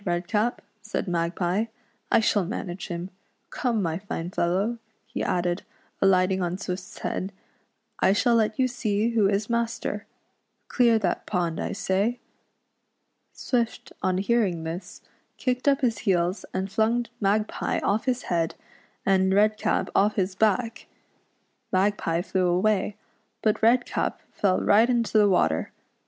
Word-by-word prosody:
Redcap," 200 +6 -1 0.2
said 215 -1 -3
Magpie, 175 +4 0 0.2
" 235 - -42
I - - +6
shall 210 -2 +2
manage 180 -1 -5
him. 175 +2 -5 0.4
Come, 230 -5 0
my 165 0 -1
fine 180 -3 -5
fellow," 190 +7 0 0.3
he 230 +2 -5
added, 175 0 0 0.4
alight 185 -1 +4
ing 190 0 0
on 175 0 -1
Swift's 185 -1 -6
head, 190 - -3 0.3
" - - -46 0.3
I - - +4
shall 235 +4 +3
let 220 -2 +2
you 260 - +3
see 225 -2 0
who 215 -4 +3
is 205 +1 0
master! 235 -1 -2 0.6
Clear 235 -3 +4
that 220 - -1
pond, 175 -4 -1
I - - -2
say." 200 +4 0 1.1
Swift 235 -3 -2
on 185 -1 +1
hearing 195 -5 +1
this 175 +3 -7 0.3
kicked 255 +1 -1
up 280 -1 +4
his 230 -5 +1
heels, 185 -2 0
and 190 +1 -3
flung 230 +3 +2
Magpie 210 +1 0
off 210 +2 +1
his 250 -2 0
head, 165 -2 -1 0.5
and 190 -1 +3
Redcap 215 +2 +2
off 205 +2 +3
his 190 -1 0
back. 220 +4 0 0.8
Mag 195 +2 +3
pie 165 +1 -1
.flew 185 -1 0
away, 195 +3 +1 0.5
but 215 -1 +2
Redcap 240 +2 +2
fell 190 -2 +1
right 220 +4 +5
into 230 -3 +2
the 205 -1 +5
water. 130 - +1
200 Hz, 145 wpm, -26 LUFS, 185-225 Hz, 1.1 s, I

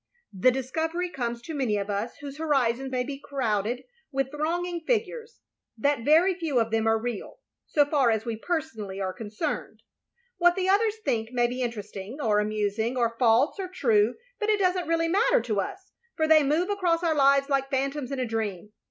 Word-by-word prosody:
The 195 +6 +4
discovery 320 +8 -2
comes 235 -4 -3
to 320 - -6
many 255 -8 0
of 200 -1 -3
us 205 +3 -3
whose 285 0 -8
horizons 270 -4 +1
may 250 -1 0
be 275 +1 -6
crowded 240 -5 -1 0.3
with 270 -1 -1
thronging 340 +4 -2
figures, 460 +3 -2 0.2
— - - -32
^that 285 -1 +1
very 325 +8 +5
few 325 -8 0
of 225 -1 0
them 225 0 +1
are 225 0 +4
real, 230 -2 -5 0.3
so 290 -2 +3
far 280 -4 +2
as 220 -1 0
we 230 -1 -2
personally 225 - -4
are 190 -1 -2
concerned. 210 0 -5 0.6
What 350 0 +5
the 375 -1 -1
others 420 +3 +3
think 225 -1 0
may 245 -1 +2
be 250 +2 -2
interesting, 215 0 -5
or 215 -6 +2
amusing, 215 +3 -1
or 235 -1 +1
false 245 - +3
or 380 - -2
true, 230 - +2 0.2
but 425 -1 -1
it 425 - +4
does 370 -2 +2
n't 360 -3 -3
really 330 0 +1
matter 395 +8 +3
to 220 -3 -1
us; 380 - -7 0.3
for 315 -1 +2
they 315 -1 +7
move 310 +7 +1
across 355 -4 +1
our 330 -2 +2
lives 275 -1 +4
like 275 -1 0
phantoms 275 0 -1
in 275 - -2
a 255 - 0
dream. 210 -4 -3
270 Hz, 195 wpm, -27 LUFS, 225-325 Hz, 0.6 s, they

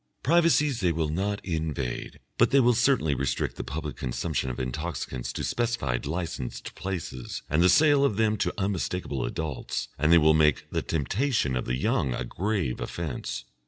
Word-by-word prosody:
Privacies 150 -4 +3
they 90 -4 +2
will 80 -1 -1
not 100 +6 -2
invade, 80 -7 -3 0.2
but - - +5
they 140 - +5
will 125 -1 +5
certainly 120 - +3
restrict 70 0 -1
the - - -5
public 75 +2 -5
consumption 65 +2 -2
of 60 - -5
intoxicants 65 -2 -4
to - - -4
specified 115 - -1
licensed 80 -6 -4
places 85 -10 -5
and 75 +3 +3
the 90 - +6
sale 145 - +5
of 140 -7 +2
them 110 -1 +3
to - - 0
unmistakable 90 - -2
adults, 80 -5 -3
and 75 +1 +3
they 85 - +8
will 80 -1 +5
make 75 -2 +3
the - - 0
temptation 85 - 0
of 65 - -2
the 60 +1 -1
young 65 -1 +1
a 60 - -3
grave 95 - -1
offence. 80 -7 -4
80 Hz, 170 wpm, -27 LUFS, 70-105 Hz, 0.2 s, they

